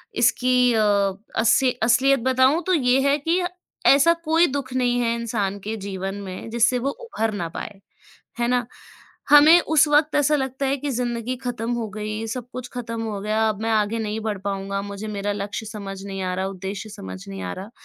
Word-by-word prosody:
इसकी 250 +1 +3
अ, 220 - +2 0.6
असी 250 +3 +4
असलियत 270 +3 +4
बताऊँ, 260 +6 +3
तो 370 - +3
ये 260 -4 +3
है 285 - +3
कि 335 +5 +1 0.5
ऐसा 285 +5 +6
कोई 325 +2 +4
दुख 270 -2 -4
नहीं 245 -1 +1
है 230 -1 +1
इंसान 215 -4 -2
के 215 +3 -4
जीवन 195 -1 -5
में, 190 +3 -7
जिससे 235 +2 +2
वो 265 +3 -1
उभर 225 - -3
ना 175 -4 -3
पाए। 195 +4 -8 0.6
है 235 - +1
ना? 245 -1 +1 0.6
हमें 305 +4 +8
उस 315 -1 +3
वक़्त 295 +1 +3
ऐसा 295 +1 +3
लगता 265 0 -2
है 270 +1 +1
कि 285 +2 -3
ज़िंदगी 240 -1 -2
खत्म 240 -1 -2
हो 235 -2 -2
गई, 215 +2 -4
सब 245 +1 -5
कुछ 250 -1 -6
खत्म 230 -2 -4
हो 210 -3 -4
गया, 220 +1 +1
अब 210 0 -5
मैं 225 - -1
आगे 215 +1 +1
नहीं 215 0 -3
बढ़ 215 -2 -3
पाऊँगा, 195 0 -2
मुझे 200 +1 -6
मेरा 205 0 -2
लक्ष्य 205 +2 -5
समझ 200 -3 -7
नहीं 195 -1 -5
आ 185 0 -2
रहा, 190 +1 -2
उद्देश्य 195 +2 -6
समझ 95 - -8
नहीं 95 -1 -6
आ 90 -1 -4
रहा। 200 +4 -8
230 Hz, 200 wpm, -23 LUFS, 205-260 Hz, 0.6 s, हमें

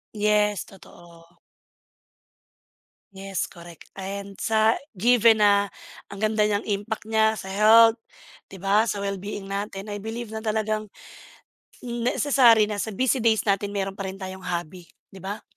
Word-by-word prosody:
Yes, 210 -2 +1
totoo. 170 -2 -17 1.7
Yes 195 -1 -4
correct, 170 -1 -14
and 195 +1 -7
sa 220 0 +3 0.2
given 230 +1 +5
na 200 -1 +3 0.4
ang 200 - -9
ganda 215 0 +1
niyang 205 0 -1
impact 210 +1 -3
niya 220 0 +2
sa - - -8
health, 225 +3 +5 0.5
‘di 195 - -11
ba, 205 +4 +2
sa 205 - -2
well-being 200 0 -5
natin, 195 0 -5
I 205 -1 -6
believe 225 +1 -6
na 220 - -5
talagang 215 -1 -2 0.9
necessary 240 -2 +3
na 205 - -3
sa 215 0 -3
busy 260 +4 +1
days 225 -2 +2
natin 200 0 -1
meron 195 0 -3
pa 195 - -4
rin 190 +1 -8
tayong 190 0 -8
hobby, 175 0 -5 0.2
‘di 195 - -13
ba? 195 +3 -6
205 Hz, 145 wpm, -24 LUFS, 195-220 Hz, 1.7 s, given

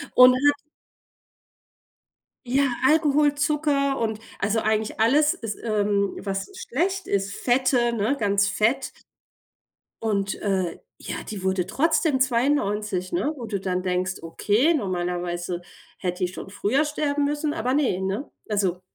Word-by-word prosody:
Und 250 0 +9
hat 290 +2 +3 1.9
Ja, 265 +3 +2 0.2
Alkohol, 300 -1 +3
Zucker 290 -2 +1
und 220 -2 -2 0.2
also 210 +3 +1
eigentlich 215 0 -1
alles 295 +7 +4
ist 220 -3 -6
ähm, 205 -2 0
was 195 - -4
schlecht 385 -5 -2
ist, 200 0 -1
Fette, 245 -1 +2
ne, 230 +5 0
ganz 200 -2 +2
fett. 245 +7 +1 1.1
Und, 200 -3 -1
äh, 190 -4 -1 0.2
ja, - - -5
die 205 -3 -5
wurde 190 -1 0
trotzdem 310 - +1
92, 215 -7 0
ne? 315 -3 0
Wo 240 -4 -6
du 205 -3 -3
dann 185 -1 -1
denkst: 185 0 -1
„Okay, 210 - +2
normalerweise 175 - -2 0.4
hätte 180 0 -2
die - - 0
schon 190 - -8
früher 235 +9 +1
sterben 295 -1 -1
müssen.“, 295 +1 -1
aber 255 -5 -1
ne, 265 -11 +1
ne? 195 +9 -3 0.2
Also 195 -4 0
220 Hz, 135 wpm, -24 LUFS, 195-285 Hz, 1.9 s, Und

